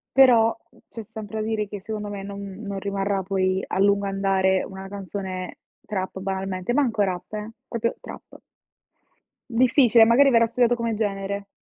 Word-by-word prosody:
però, 240 Hz, -4 st, +6 dB, 0.2 s
mhmm, -, -, -23 dB
c'è 225 Hz, -, -8 dB
sempre 220 Hz, 0 st, -6 dB
da 215 Hz, -, -3 dB
dire 215 Hz, -2 st, -1 dB
che 205 Hz, 0 st, -7 dB
secondo 210 Hz, 0 st, -5 dB
me 200 Hz, -1 st, -6 dB
non 200 Hz, 0 st, -7 dB
non 200 Hz, 0 st, -6 dB
rimarrà 195 Hz, 0 st, -1 dB
poi 190 Hz, 0 st, 0 dB
a -, -, -2 dB
lungo 200 Hz, 0 st, +3 dB
andare 195 Hz, -1 st, +1 dB
una 190 Hz, 0 st, -8 dB
canzone 190 Hz, -2 st, -6 dB, 0.3 s
trap 190 Hz, -2 st, -4 dB
banalmente; 190 Hz, +1 st, -3 dB
manco 245 Hz, -6 st, +1 dB
rap 180 Hz, -2 st, -3 dB
eh, 215 Hz, +1 st, -5 dB, 0.2 s
proprio 230 Hz, 0 st, -2 dB
trap. -, -, -11 dB, 1.1 s
Difficile, 240 Hz, -1 st, +5 dB
magari 245 Hz, +5 st, +6 dB
verrà 230 Hz, -3 st, +5 dB
studiato 240 Hz, +1 st, +2 dB
come 230 Hz, -1 st, -2 dB
genere. 200 Hz, -1 st, -3 dB
200 Hz, 160 wpm, -24 LUFS, 195-225 Hz, 1.1 s, però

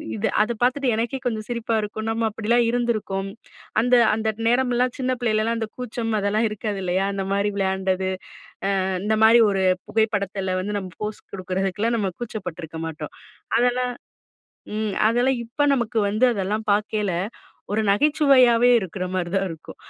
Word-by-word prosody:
இது 105 Hz, -, 0 dB
அத 215 Hz, -, +1 dB
பார்த்துட்டு 255 Hz, +1 st, +2 dB
எனக்கே 235 Hz, +4 st, -2 dB
கொஞ்சம் 220 Hz, -3 st, -2 dB
சிரிப்பா 235 Hz, -1 st, -1 dB
இருக்கும். 220 Hz, +1 st, -5 dB
நம்ம 225 Hz, 0 st, 0 dB
அப்படிலாம் 230 Hz, +3 st, +1 dB
இருந்துருக்கோம். 215 Hz, -5 st, -1 dB, 0.5 s
அந்த 250 Hz, +1 st, +3 dB, 0.2 s
அந்த 220 Hz, 0 st, 0 dB, 0.2 s
நேரமெல்லாம் 250 Hz, 0 st, +1 dB
சின்ன 255 Hz, 0 st, 0 dB
பிள்ளையிலலா, 225 Hz, 0 st, +1 dB
அந்த 220 Hz, -1 st, -3 dB
கூச்சம் 235 Hz, -2 st, -3 dB
அதெல்லா 205 Hz, +2 st, +1 dB
இருக்காது 210 Hz, -2 st, -4 dB
இல்லையா. 185 Hz, +2 st, 0 dB
அந்த 195 Hz, -1 st, -3 dB
மாதிரி 200 Hz, +1 st, +1 dB
விளையாண்டது, 190 Hz, -1 st, 0 dB, 0.7 s
அ -, -, 0 dB, 0.2 s
இந்த 215 Hz, 0 st, +2 dB
மாதிரி 230 Hz, +1 st, +7 dB
ஒரு 195 Hz, -1 st, 0 dB, 0.3 s
புகைப்படத்தில 200 Hz, -4 st, 0 dB
வந்து 205 Hz, +2 st, -2 dB
நம்ம 185 Hz, -2 st, -8 dB
போஸ் 210 Hz, 0 st, -4 dB
கொடுக்குறதுக்குலாம், 195 Hz, +4 st, -1 dB
நம்ம 195 Hz, -3 st, -1 dB
கூச்சப்பட்டுருக்க 175 Hz, -8 st, -6 dB
மாட்டோம். 155 Hz, -1 st, -7 dB, 0.4 s
அதெல்லா 245 Hz, +1 st, +2 dB, 0.9 s
ம் 215 Hz, -2 st, -2 dB
அதெல்லாம் 245 Hz, +3 st, +2 dB
இப்ப 240 Hz, +6 st, -2 dB
நமக்கு 235 Hz, -3 st, -1 dB
வந்து 215 Hz, +5 st, +2 dB
அதெல்லாம் 210 Hz, +2 st, -2 dB
பார்க்கேல, 210 Hz, -1 st, -1 dB, 0.6 s
ஒரு 220 Hz, +1 st, +1 dB
நகைச்சுவையாவே 255 Hz, 0 st, +5 dB
இருக்கிற 185 Hz, 0 st, -4 dB
மாரி 175 Hz, -2 st, -1 dB
தான் 195 Hz, 0 st, +1 dB
இருக்கும். 165 Hz, -1 st, -10 dB
215 Hz, 150 wpm, -23 LUFS, 195-240 Hz, 0.9 s, மாதிரி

